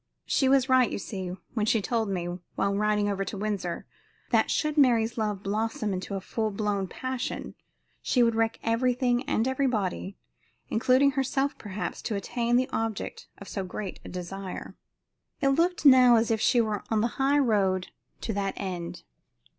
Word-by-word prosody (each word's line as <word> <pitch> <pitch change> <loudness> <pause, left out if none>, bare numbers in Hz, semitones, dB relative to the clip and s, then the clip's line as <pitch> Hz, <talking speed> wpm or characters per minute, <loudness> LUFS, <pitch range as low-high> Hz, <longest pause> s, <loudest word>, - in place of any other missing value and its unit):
She 265 - +2
was 265 -1 +4
right, 255 -3 +4
you - - -3
see, 190 -2 -5 0.2
when 215 -2 0
she 225 - +3
told 220 +1 -1
me, 180 -3 -2 0.3
while 200 - +1
riding 210 0 +1
over 195 -1 -1
to 195 +2 -5
Windsor, 195 -4 -3 0.5
that - - +3
should 305 -1 0
Mary's 240 -5 +4
love 210 -4 -2
blossom 215 0 -1
into 185 +2 -4
a - - -1
full 220 +3 -2
blown 200 -2 -1
passion 255 +4 -4 0.5
she 245 - +3
would 230 -1 +3
wreck 225 0 +1
everything 245 +1 +1
and 225 -1 +1
everybody, 220 -8 -1 0.5
including 260 +4 +4
herself 270 +1 0
perhaps, 205 -1 -5
to 215 - -3
attain 235 +4 -1
the 255 +1 +3
object 225 -2 -3
of 200 - -11
so 195 - -3
great 185 +1 -6
a - - -9
desire. 185 +1 -6 0.6
It 275 - +2
looked 335 +4 +1
now 255 -3 +8
as 225 0 +2
if 220 -1 +1
she 245 - +4
were 215 -3 0
on 220 -1 +2
the 235 +4 -2
high 275 +2 +4
road 195 -8 +2 0.3
to 225 - -2
that 195 -1 -2
end. 180 -3 -5
220 Hz, 170 wpm, -27 LUFS, 200-255 Hz, 0.6 s, now